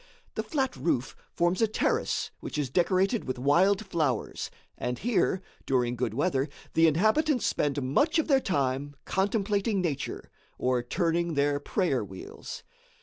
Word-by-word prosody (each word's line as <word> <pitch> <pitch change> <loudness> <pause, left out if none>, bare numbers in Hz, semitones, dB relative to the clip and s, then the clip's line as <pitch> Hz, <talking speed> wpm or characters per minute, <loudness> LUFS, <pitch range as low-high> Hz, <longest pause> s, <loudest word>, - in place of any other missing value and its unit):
The - - -1
flat 270 -5 -1
roof 135 -2 -1 0.2
forms 175 +3 +1
a 225 - +5
terrace 215 - 0
which - - -6
is 140 -4 -1
decorated 185 - +2
with 130 - -3
wild 185 +11 +3
flowers, 155 -7 -1 0.3
and 125 0 -3
here, 195 - +1 0.2
during 125 -2 +1
good 115 -3 -2
weather, 140 -1 +1 0.2
the 165 0 +5
inhabitants 220 - +2
spend 145 -1 +1
much 290 - +2
of 320 - +1
their 275 -4 +5
time 145 - -1
contemplating 200 +1 +1
nature, 155 -7 -3 0.3
or 125 -1 +1
turning 170 +5 0
their 145 0 +2
prayer 145 - 0
wheels. 95 -2 -9
165 Hz, 145 wpm, -28 LUFS, 135-200 Hz, 0.3 s, a